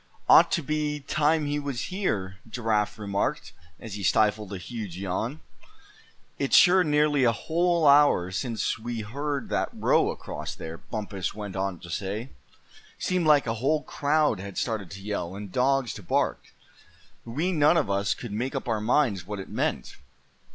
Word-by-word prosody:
"Ought - - +7
to 170 - +1
be 150 0 -1
time 150 +2 +1
he 145 0 -1
was 140 -4 -4
here," 100 - -2
Giraffe 110 -3 0
remarked, 100 -2 -2 0.3
as 110 - -8
he 105 - -5
stifled 105 +1 +2
a 100 - -4
huge 100 -2 -7
yawn. 100 - -3 1.0
"It's 135 - +2
sure 185 +1 +7
nearly 150 -3 +2
a 120 - +5
whole 170 +5 +1
hour 140 -11 +5
since 115 +4 -2
we 115 0 -4
heard 140 +6 -4
that - - 0
row - - +2
across - - -6
there," 80 0 -8
Bumpus 100 -4 -5
went 105 -3 -6
on 95 -1 -2
to 85 - -10
say. 105 +7 -4 0.7
"Seemed 180 -3 0
like 150 -2 +5
a 115 - -1
whole 150 +3 +1
crowd 150 -5 +1
had 100 0 -8
started 110 -6 -2
to 95 0 -10
yell, 95 -3 -3
and 100 -1 -7
dogs 130 -2 +1
to - - -9
bark. 90 - 0 0.8
We 150 +11 -2
none 155 0 +4
of 155 - +1
us 100 0 +1
could 120 - -8
make 125 +7 -3
up 135 - -4
our 110 -3 0
minds 110 - +1
what 105 0 -4
it 95 - -8
meant. - - -2
115 Hz, 170 wpm, -26 LUFS, 100-150 Hz, 1.0 s, Ought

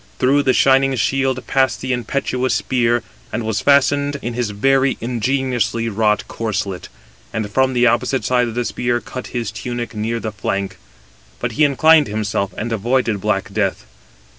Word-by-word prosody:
Through 135 +3 +3
the 130 -2 +2
shining 135 0 +4
shield 130 +2 0
passed 130 -5 +1
the 130 +2 -2
impetuous 125 +1 -1
spear, 120 -2 +1 0.3
and 115 +2 -2
was 110 -1 -1
fastened 140 0 +3
in 120 - -3
his 120 -2 -2
very 135 +6 +2
ingeniously 120 -1 -1
wrought 105 0 +1
corslet, 100 -5 -3 0.4
and 110 -2 -3
from 130 +3 +2
the 125 0 +3
opposite 120 +3 +1
side 125 -2 +1
the 120 0 -1
spear 120 0 -1
cut 125 +1 -8
his 120 -2 -3
tunic 120 -1 -5
near 110 +2 -2
the 110 -1 -4
flank. 100 -1 -3 0.6
But - - -2
he 155 - +1
inclined 155 +2 +5
himself, 105 -2 -2
and 115 +1 -3
avoided 115 -1 0
black 100 -2 -1
death. 100 -2 -1
120 Hz, 160 wpm, -19 LUFS, 110-130 Hz, 0.6 s, inclined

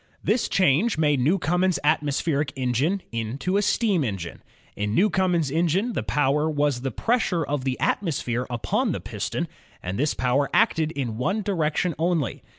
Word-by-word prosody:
This 220 +4 +1
change 185 - +2
made 150 -3 +2
Newcomen's 180 +5 +2
atmospheric 145 -1 +1
engine 135 - 0
into 115 - -2
a 205 - +3
steam 205 -5 +1
engine. 95 -8 -5 0.3
In 105 +1 -2
Newcomen's 180 -5 +2
engine 175 - +1
the - - -1
power 150 +2 +1
was 145 -4 0
the 135 - -2
pressure 220 - 0
of 140 -2 -3
the 130 -1 -1
atmosphere 125 - -1
upon 120 -2 -1
the - - -3
piston, - - -4 0.4
and 95 +4 -4
this 145 +2 +1
power 130 +3 +1
acted 160 -8 +3
in 120 -6 -3
one 195 +11 0
direction 170 -3 0
only. 165 -6 0
150 Hz, 155 wpm, -24 LUFS, 130-180 Hz, 0.4 s, a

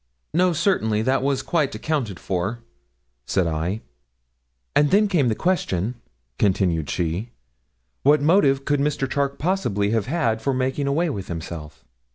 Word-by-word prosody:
'No, 180 +2 +3
certainly; 110 - +1
that 130 +3 +2
was 135 0 0
quite 150 -5 0
accounted 130 - -2
for,' 95 +6 -3 0.6
said 95 -2 +1
I. 85 +6 -2 0.9
'And 145 0 +4
then 210 +5 +4
came 170 -10 +2
the 110 - +1
question,' 120 - 0 0.5
continued 90 -6 +1
she, 90 +6 -2 0.7
'what 150 +2 +5
motive 145 -4 +3
could 145 -1 +1
Mr. 140 -1 0
Charke 140 +1 -1
possibly 120 - 0
have 110 -2 0
had 130 -8 0
for 135 +2 0
making 130 +2 -1
away 160 +4 +1
with 100 -7 -5
himself.' 80 -5 -7
130 Hz, 145 wpm, -23 LUFS, 95-150 Hz, 0.9 s, what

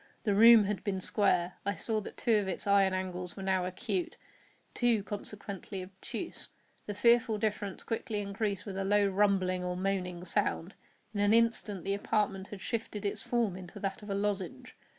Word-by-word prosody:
The 210 - +2
room 225 +1 +8
had 205 0 -2
been 195 -2 -1
square. 185 -3 +1
I 200 0 -1
saw 220 -2 -1
that - - -9
two 230 -2 +2
of 205 -2 0
its 190 - -3
iron 200 -1 +4
angles 185 -1 -4
were 195 - -5
now 190 -1 +1
acute—two, 210 +3 -3
consequently, 200 -1 -6
obtuse. 210 - -6 0.4
The 205 - -3
fearful 235 0 +4
difference 210 -2 -2
quickly 225 -1 -2
increased 200 0 -2
with 195 -2 -5
a 195 - -1
low 205 +1 +3
rumbling 190 -2 +2
or 180 0 -2
moaning 180 -2 -2
sound. 175 +1 -1 0.4
In 205 - -3
an 205 +2 +4
instant 230 -4 +1
the 195 - 0
apartment 200 -1 0
had 200 -2 -9
shifted 220 -2 -4
its 200 - -2
form 235 -6 0
into 185 +1 -9
that 195 0 -3
of 210 - -10
a 195 - -1
lozenge. 200 -2 -3
200 Hz, 175 wpm, -31 LUFS, 190-210 Hz, 0.4 s, room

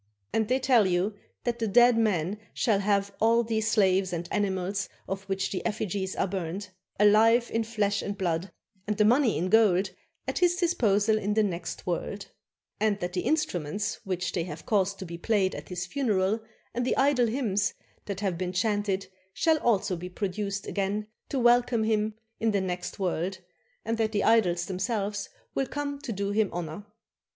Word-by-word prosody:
And 220 -1 +1
they 255 - +2
tell 250 -6 +4
you 185 +3 +1 0.3
that 240 -1 -1
the 225 - 0
dead 240 +3 +6
man 205 -3 +1 0.2
shall 220 -6 +2
have 200 0 +1
all 230 +2 +4
these 220 -1 0
slaves 190 -3 +3
and 170 0 -3
animals 195 -1 -1 0.2
of 195 +1 -3
which 195 0 -2
the 185 - -3
effigies 200 -3 -2
are - - +1
burnt, 185 +1 -4 0.3
alive 225 +3 +5
in 225 - +1
flesh 210 -3 0
and 200 0 -4
blood, 175 -1 -1 0.4
and 210 -1 -1
the 210 - +4
money 245 +1 +4
in 180 +3 -1
gold, 200 -4 +4 0.4
at - - -1
his 350 -1 +4
disposal 220 - +2
in 210 0 -1
the 220 - +4
next 170 -4 -4
world; 190 +3 -3 0.5
and 210 -1 +1
that 175 -1 -3
the 180 - 0
instruments 205 - -1
which 185 -1 -2
they 170 - -1
have 180 - -8
caused 200 -2 +1
to 190 - -6
be 170 -1 -7
played 200 -2 +1
at - - -8
his 180 -1 -3
funeral 210 -2 +1 0.3
and 245 +1 -1
the 250 - 0
idol 265 -3 +4
hymns 220 -5 0 0.3
that 200 -1 -4
have 185 -4 -1
been 180 -1 -2
chanted 205 0 0 0.3
shall 320 +6 +2
also 205 -7 +1
be 180 +1 -6
produced 200 +1 -3
again 200 +1 -1 0.2
to 275 - -2
welcome 240 -1 +4
him 215 -1 +1 0.2
in 225 - +2
the 205 -2 +2
next 180 -1 -4
world; 185 0 -1 0.5
and 230 +1 -1
that 220 0 +1
the 205 - +1
idols 180 -7 +3
themselves 200 +1 -2 0.2
will 270 - 0
come 285 0 -4
to 280 -4 -5
do 200 -1 -2
him 210 -1 +2
honor. 175 +4 -5
205 Hz, 180 wpm, -28 LUFS, 190-225 Hz, 0.5 s, dead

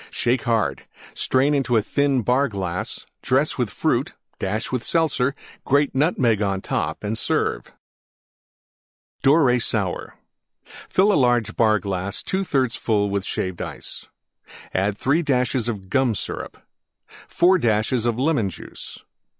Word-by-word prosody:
Shake 125 +2 0
hard; 110 - 0 0.3
strain 135 +3 +2
into 130 -5 +2
thin 135 +3 +1
Bar 130 +5 +2
glass; 95 -5 -4 0.2
dress - - +1
with - - +1
Fruit; - - -1 0.2
dash 105 +3 -2
with 125 -2 -1
Seltzer; 140 -5 +1 0.3
grate 140 +1 +2
Nutmeg 130 - +2
on 100 -2 0
top - - -2
and 105 +2 -1
serve. - - -1 1.5
DORAY 135 -3 +4
SOUR 105 -6 -2 0.7
Fill 200 +2 +4
large 120 -5 +2
Bar 110 -2 +4
glass 95 0 -3
2/3 140 -11 0
full 100 -3 +1
Shaved 95 -2 -3
Ice. - - -7 0.7
3 105 - +1
dashes 125 -5 0
Gum 115 +3 0
Syrup - - -5 0.7
4 180 +2 +4
dashes 115 0 +1
Lemon 120 -2 +1
Juice. - - -9
120 Hz, 115 wpm, -23 LUFS, 105-140 Hz, 1.5 s, DORAY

